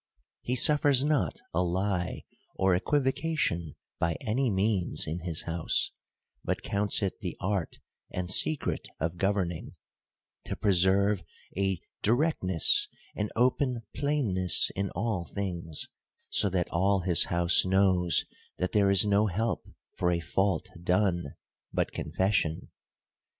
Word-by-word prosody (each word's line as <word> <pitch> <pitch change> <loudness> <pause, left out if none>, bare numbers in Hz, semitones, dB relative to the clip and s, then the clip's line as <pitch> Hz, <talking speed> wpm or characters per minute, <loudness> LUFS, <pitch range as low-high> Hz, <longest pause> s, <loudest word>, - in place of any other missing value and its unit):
— - - -65
He - - +2
suffers 145 0 +5
not 140 - 0
a 85 - +1
lie 90 0 -1 0.3
or 95 -1 +2
equivocation 135 - 0 0.2
by 85 0 +1
any 125 +2 0
means 95 -2 0
in 80 +3 -4
his 85 -2 -2
house, 85 -1 -1 0.5
but - - -2
counts 100 +1 0
it 95 - -2
the 90 -6 -5
art 95 -3 -2 0.3
and 90 0 -3
secret 155 +9 +2
of 80 +3 -2
governing, 95 -3 -1 0.7
to - - -4
preserve 100 0 +2 0.3
a 95 -2 0 0.2
directness 110 - +2 0.3
and 105 0 -3
open 125 0 +1
plainness 120 -12 +2
in 100 0 -2
all 100 -1 -1
things: 85 -6 -5 0.4
so 100 - +4
that 90 -2 -1
all 95 +3 +2
his 85 -1 +3
house 85 0 +3
knows 95 -2 +4 0.3
that 90 - -2
there 100 -2 +3
is 100 0 +5
no 105 +1 +3
help 110 +5 -2 0.3
for 90 - +2
a 85 -1 +1
fault 95 +2 -1
done, 90 -4 0 0.4
but - - -1
confes 95 +6 -1
sion. 80 -4 -1
95 Hz, 130 wpm, -28 LUFS, 90-105 Hz, 0.7 s, suffers